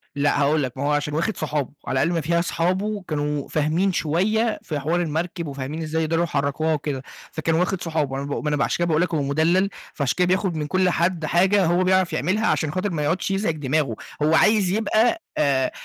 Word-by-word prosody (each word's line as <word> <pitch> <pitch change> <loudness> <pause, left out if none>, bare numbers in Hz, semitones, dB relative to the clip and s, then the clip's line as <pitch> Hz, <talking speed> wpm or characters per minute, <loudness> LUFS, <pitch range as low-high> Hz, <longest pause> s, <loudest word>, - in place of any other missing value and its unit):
لأ 145 0 +1
هاقول 145 +1 +2
لك، 130 0 -5
ما 135 - -3
هو 145 - +1
عشان 145 0 0
واخد 170 +8 -1
صحابه، 150 -3 -2
وعلى 130 - -1
أقل 155 +6 +2
ما 170 -2 0
فيها 170 +3 +1
أصحابه 185 +5 -1
كانوا 150 -2 -2
فاهمين 160 +6 +1
شوية 215 +9 +1
في 150 -3 -3
حوار 165 +5 0
المركب، 170 +1 -3
وفاهمين 140 +3 -5
إزاي 160 +1 -1
يقدروا 165 +2 +1
يحركوها 145 0 0
وكده، 145 -3 -3 0.3
فكان 160 +1 -1
واخد 180 +2 0
صُحابه 155 -5 -1
أنا 140 - -3
باقو 140 - -3
ما 150 - -1
أنا 150 - 0
بقى 140 - +2
عشان - - -1
كده 175 - 0
باقول 160 -1 +2
لك 180 -1 -1
هو 155 - +1
مُدلَّل، 165 +7 +2 0.2
فعشان 140 -5 -1
كده 180 -1 +3
بياخد 185 -1 +1
من 150 -1 -2
كل 185 +3 +2
حد 170 -1 0
حاجة 190 +4 +3
هو 175 +2 +2
بيعرف 185 -1 +2
يعملها، 190 - 0
عشان 155 -3 +1
خاطر 185 +5 -1
ما 155 -3 -2
يقعدش 170 +6 0
يزعج 195 -4 0
دماغه، 145 -4 0 0.3
هو 155 +2 +3
عايز 210 +1 +4
يبقى 225 - +2 0.2
آآ 135 -3 +2
160 Hz, 220 wpm, -23 LUFS, 145-185 Hz, 0.3 s, عايز